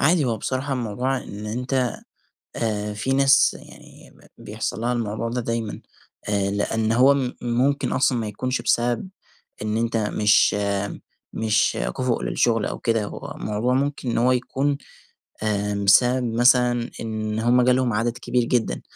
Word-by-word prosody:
عادي 155 +1 +3
هو 115 -3 0
بصراحة 130 +5 -3
الموضوع 125 +2 -1
إن 105 -4 -7
أنت 125 +2 -1 0.6
آآ 105 -2 -2
في 120 +6 -2
ناس 135 0 +4
يعني - - -16 0.3
ب - - -14
بيحصل 110 - -4
لها 120 +1 0
الموضوع 115 0 -2
ده 125 +1 -2
دايمًا، 115 -2 -3 0.5
آآ 100 -1 0
لأن 110 +2 0
هو 130 +4 +5
م 130 -3 -1
ممكن 125 +4 0
أصلًا 130 -1 +2
ما 110 -2 -2
يكونش 130 +5 -2
بسبب 120 +8 0 0.5
إن 105 +1 -1
أنت 115 0 0
مش 105 -1 +3 0.8
مش 110 -1 +1 0.2
كُفء 130 -3 0
للشغل 115 -3 +1
أو - - -4
كده 115 -2 0
هو - - -8
الموضوع 110 +4 -1
ممكن 140 -1 -1
إن - - -1
هو 125 +2 +3
يكون 135 +3 0 0.7
آآ 105 -1 -1
بسبب 115 +4 +3
مثلًا 120 0 +3
إن 110 -1 -3
هُم 120 +2 +3
جالهم 125 -1 +2
عدد 115 +3 -1
كبير 125 0 0
جدًا، 120 -1 -1
120 Hz, 150 wpm, -23 LUFS, 110-125 Hz, 0.8 s, هو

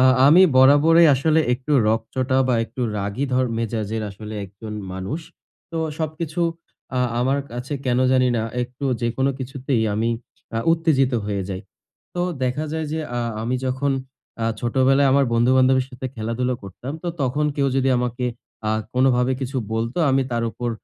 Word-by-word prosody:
আ - - +5 0.2
আমি 170 +6 +8
বরাবরই 150 +5 +7
আসলে 155 +4 +3
একটু 130 +4 -2 0.2
রকচটা 125 +4 0
বা 125 - +3
একটু 130 - -9 0.2
রাগী 100 +7 -2
ধর 130 +1 +3
মেজাজের 110 -1 -2
আসলে 105 +2 -8
একজন 100 +3 -9 0.2
মানুষ। 95 - -4 0.5
তো 165 - -3 0.2
সবকিছু 160 +1 -3 0.6
আ - - +2 0.2
আমার 135 +3 +2
কাছে 125 +4 -5
কেনো 125 0 +2
জানি 130 -1 +4
না, 110 - 0 0.2
একটু 125 +3 -7 0.2
যেকোনো 130 +4 +1
কিছুতেই 130 -2 -2
আমি 115 +2 +1 0.5
আ - - +1
উত্তেজিত 145 -6 +2
হয়ে 100 -2 -2
যাই। 95 -1 -4 0.6
তো 175 - 0 0.2
দেখা 135 +5 -1
যায় 160 -1 -2
যে, 160 - -1 0.2
আ - - 0 0.2
আমি 120 +3 -1
যখন 130 +2 0 0.5
আ 115 - +1
ছোটবেলায় 135 +3 +3
আমার 140 0 +4
বন্ধু-বান্ধবের 130 +2 +4
সাথে 130 0 -7
খেলাধুলা 115 +3 -1
করতাম। 120 +9 -7
তো 175 - -3
তখন 135 +4 +1
কেউ 140 -1 +1
যদি 135 0 +2
আমাকে 125 0 -2 0.4
আ - - +2 0.2
কোনভাবে 125 0 +3
কিছু 130 +1 -3 0.2
বলতো 115 +4 -2
আমি 135 0 +3
তার 115 0 0
উপর 120 +2 -3
130 Hz, 160 wpm, -22 LUFS, 115-140 Hz, 0.6 s, আমি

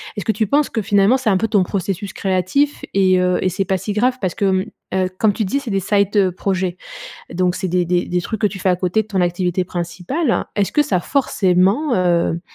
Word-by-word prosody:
Est-ce 205 - -4
que 220 - +2
tu 220 - 0
penses 290 +6 +2
que 220 - -2
finalement 200 +5 +3
c'est 240 -5 0
un 190 - +3
peu 225 - 0
ton 205 -4 +2
processus 195 +1 -3
créatif 195 +10 0
et 190 -1 +3
heu, 180 0 +1
et 185 - +2
c'est 195 +2 -2
pas 190 +1 0
si 205 +3 -4
grave 250 +4 +1
parce 185 -3 -2
que, 210 - -1
hem, 190 0 +1 0.4
heu, - - -3
comme 215 -2 +3
tu 215 - -2
dis 240 +9 0
c'est 265 -5 -6
des 195 - +1
side 200 0 +2
projets, 185 -2 -1 0.6
donc 180 0 +1
c'est 190 -1 -3
des 180 0 +1
des 175 +1 0
des 180 0 -1
trucs 215 +3 -5
que 210 - +4
tu 195 0 -7
fais 185 - +1
à 180 - +3
côté 180 +4 0
de - - -23
ton 190 -3 -1
activité 180 +1 0
principale. 180 - -2
Est-ce 200 -2 0
que 295 - +3
ça 205 - -1
a - - 0
forcément, 205 - +1
heu, 170 -2 +1
190 Hz, 245 wpm, -19 LUFS, 180-215 Hz, 0.6 s, que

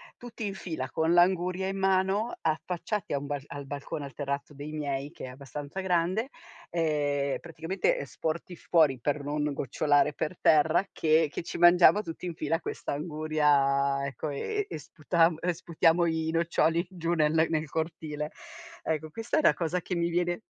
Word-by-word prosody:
tutti 235 -2 -7
in 200 - -2
fila 160 -9 -5
con 160 +1 +1
l'anguria 180 +1 +3
in 195 - -3
mano, 195 +4 +1
affacciati 170 +4 -2
a - - +2
un 140 - -5
bal 145 -1 -3
al 140 -1 -7
balcone, 140 +1 -5
al 140 - -10
terrazzo 140 0 -4
dei 145 +2 -7
miei 140 -2 -3
che 170 - -12
è - - -7
abbastanza 140 +6 -7
grande, 185 +7 +1 0.4
ehm, 145 -4 0
praticamente, 175 - -1
ehm, - - -3
sporti 170 +2 -4
fuori 155 -7 +3
per 145 +3 -1
non 150 0 -1
gocciolare 145 +3 +2
per 160 +3 -3
terra 155 +5 +4
che 155 -1 +3
che - - -4
ci - - -6
mangiamo 175 +4 +6
tutti 165 +1 -6
in 170 - -5
fila 165 +2 -1
questa - - -5
anguria, 145 -3 +1
ecco, 140 +3 -4
ehm, 415 - -2
e - - -4
sputam 165 +2 +1
uhm, 180 - 0
sputiamo 170 0 +2
i 160 -1 0
noccioli 165 0 +2
giù 170 -1 -2
ne 155 -3 +3
nel 160 +1 +2
nel 155 -1 -1
cortile. 160 +2 -3 0.8
Ecco, 155 0 -2
questa 225 - -2
è - - +5
una - - +5
cosa 175 +1 -1
che 180 - -3
mi 170 0 +1
viene 175 +2 0
160 Hz, 180 wpm, -28 LUFS, 145-175 Hz, 0.8 s, mangiamo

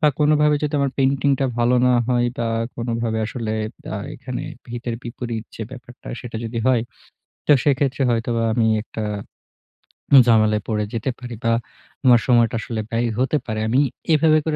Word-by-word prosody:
বা 150 - +5
কোনোভাবে 150 0 +4
যদি 150 0 -1
আমার 140 -1 +1
পেইন্টিংটা 135 0 +2
ভালো 120 +1 +3
না 125 - +4 0.2
হয় 120 -1 +2
বা 115 - 0 0.3
কোনোভাবে 115 -1 -2
আসলে 115 -2 -4 0.4
আ - - -2 0.2
এখানে 125 0 -5 0.3
হিতের 120 -1 -4
বিপরীত 120 -2 -5
যে 110 - -5
ব্যাপারটা 125 -1 -12
সেটা 120 -2 -7
যদি 115 +1 -4
হয়, 125 -3 +3 0.6
তো - - +3
সেক্ষেত্রে 140 -1 +1
হয়তোবা 115 0 0
আমি 110 -1 +2 0.2
একটা 110 -1 -6 1.2
ঝামেলায় 110 -2 +4
পড়ে 105 -2 0
যেতে 115 +3 -2
পারি 125 -2 -7
বা 115 - +3 0.5
আমার 120 -2 +7
সময়টা 120 -2 +4
আসলে 110 -1 -3
ব্যয় 115 +1 0
হতে 135 +4 +2
পারে। 110 -2 -3
আমি 125 +4 +2 0.3
এভাবে 155 0 +5
করে 155 -2 0
120 Hz, 160 wpm, -21 LUFS, 115-135 Hz, 1.2 s, আমার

